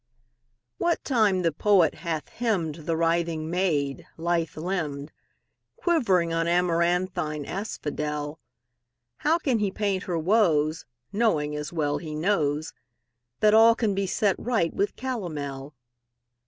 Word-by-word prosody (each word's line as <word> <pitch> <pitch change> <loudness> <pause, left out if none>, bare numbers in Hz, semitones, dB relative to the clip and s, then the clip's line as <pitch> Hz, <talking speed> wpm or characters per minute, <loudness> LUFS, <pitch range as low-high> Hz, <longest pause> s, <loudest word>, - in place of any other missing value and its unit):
What 345 - +1
time 215 -8 +2
the 165 - +2
poet 190 +2 +3
hath 160 -5 -3
hymned 170 -10 -2
The 165 -1 +1
writhing 165 -1 0
maid, 155 -7 0
lithe 165 -1 -1
limbed, 155 -4 -3 0.6
Quivering 190 - +2
on 165 0 0
amaranthine 170 -3 +1
asphodel, 150 -5 -4 0.8
How 320 +2 +2
can 265 -9 0
he 205 -1 +1
paint 195 -1 -2
her 175 -2 -1
woes, 160 -4 +2 0.3
Knowing, 160 -10 +1
as 150 0 -4
well 150 -3 -1
he 155 -3 -6
knows, 155 -3 0 0.7
That 215 0 +5
all 225 +1 +7
can 220 -4 0
be 195 0 -1
set 200 0 +1
right 225 -9 0
with 200 - -1
calomel? 150 - -5
170 Hz, 125 wpm, -26 LUFS, 155-205 Hz, 0.8 s, all